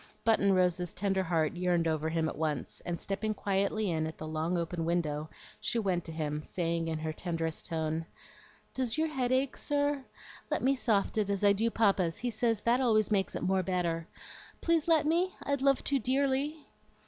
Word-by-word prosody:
Button 220 -3 +4
Rose's 180 -1 +1
tender 195 -1 0
heart 165 -3 0
yearned 175 -2 +1
over 160 0 0
him 160 0 0
at - - -4
once, 155 -3 -3
and 175 -1 -2
stepping 215 +2 -2
quietly 200 +1 0
in 160 -1 0
at 160 - -7
the 155 - -6
long 160 +3 -1
open 170 0 -2
window 155 -3 -1 0.3
she - - 0
went 185 -6 0
to 165 - -6
him, 150 -2 -3
saying 165 0 -2
in 160 -1 -1
her 155 0 -3
tenderest 165 -2 -3
tone, 160 0 -2 0.7
"Does 255 0 0
your 320 0 +1
head 255 -4 -1
ache, 260 +1 +1
sir? 285 -1 0 0.5
Let - - -1
me 265 +2 +4
soft 220 -5 +1
it 205 -2 0
as 200 0 -1
I 200 0 +6
do 225 +3 +1
Papa's; 195 -7 +2
he 245 0 -2
says 225 -1 +1
that 240 +4 +2
always 215 -4 +3
makes 195 -2 +1
it - - -3
more 190 0 +2
better. 170 -2 -1 0.5
Please 335 -2 +1
let 320 -3 +4
me? 345 +4 +1
I'd 280 -1 0
love 275 -1 +3
to 280 -1 +1
dearly." 275 +4 0
190 Hz, 195 wpm, -31 LUFS, 165-245 Hz, 0.7 s, I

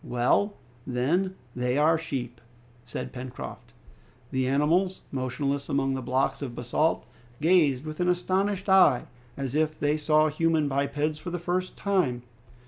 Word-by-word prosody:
"Well, 125 - +1 0.3
then, 165 +10 0 0.2
they 125 +1 0
are 155 +2 +4
sheep!" 125 -7 -4 0.4
said 120 - -6
Pencroft. 125 0 -8 0.6
The 130 -1 0
animals, 165 +8 +2
motionless 140 +2 -2
among 135 -1 +1
the 135 - -3
blocks 130 +3 0
of 125 -4 -5
basalt, 125 +7 0 0.3
gazed 155 -5 +3
with 155 +1 -6
an 180 0 +2
astonished 190 +2 0
eye, 185 -10 +5 0.3
as 135 -2 -3
if 155 0 0
they 150 +1 +1
saw 155 0 +3
human 160 0 +1
bipeds 145 +2 -1
for 175 - -6
the 175 - -3
first 180 +2 -2
time. 170 -12 0
150 Hz, 140 wpm, -27 LUFS, 130-175 Hz, 0.6 s, eye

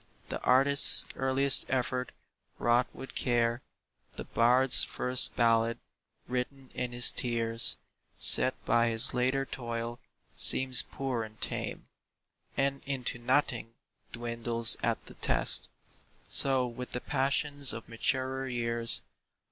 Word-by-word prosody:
The - - -7
artist's 135 +2 +4
earliest 135 +1 +2
effort, 125 0 -4 0.5
wrought 120 +1 0
with 135 - -13
care, 120 -1 -2 0.5
The - - -9
bard's 125 +3 +4
first 125 0 -2
ballad, 115 -1 0 0.5
written 130 +1 -7
in 125 -1 -6
his 120 0 0
tears, 115 -2 -4 0.4
Set - - +9
by 120 0 0
his 115 +2 +1
later 130 +2 -2
toil, 115 -2 -8 0.4
seems 130 -2 +6
poor 130 -4 -6
and 110 0 -14
tame, - - -7 0.7
And 140 0 -2
into 130 -3 -5
nothing 120 -2 -3 0.4
dwindles 115 -1 -1
at - - -4
the - - -11
test. - - -1 0.6
So 135 -2 +1
with 125 +1 -10
the 125 - -4
passions 140 0 -1
of 115 - -7
maturer 130 +3 -4
years. 115 -2 +2
125 Hz, 115 wpm, -27 LUFS, 115-130 Hz, 0.7 s, Set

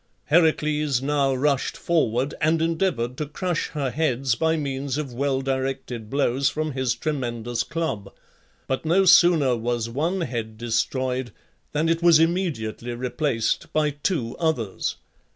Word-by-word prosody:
Heracles 150 -4 +2
now 140 0 +1
rushed 140 0 0
forward 140 -5 0
and 160 +1 +3
endeavoured 160 -7 0
to 150 - -3
crush 175 +3 -2
her 140 -5 -3
heads 135 -4 +1
by 160 +7 +1
means 140 -2 -3
of 145 -5 -4
well 135 +1 0
directed 130 -4 -3
blows 135 0 +1
from 155 +1 -2
his 130 -3 -1
tremendous 120 -4 -2
club; 150 -12 -3 0.5
but 130 - -2
no 175 +5 +3
sooner 165 -7 +6
was 120 0 -2
one 165 +9 -1
head 115 -8 -4
destroyed 125 +2 -1 0.4
than 150 +2 0
it 165 0 +1
was 170 -2 +7
immediately 155 - -1
replaced 125 -1 -1
by 150 -1 +2
two 145 -4 -2
others. 125 - -1
140 Hz, 135 wpm, -24 LUFS, 120-160 Hz, 0.5 s, was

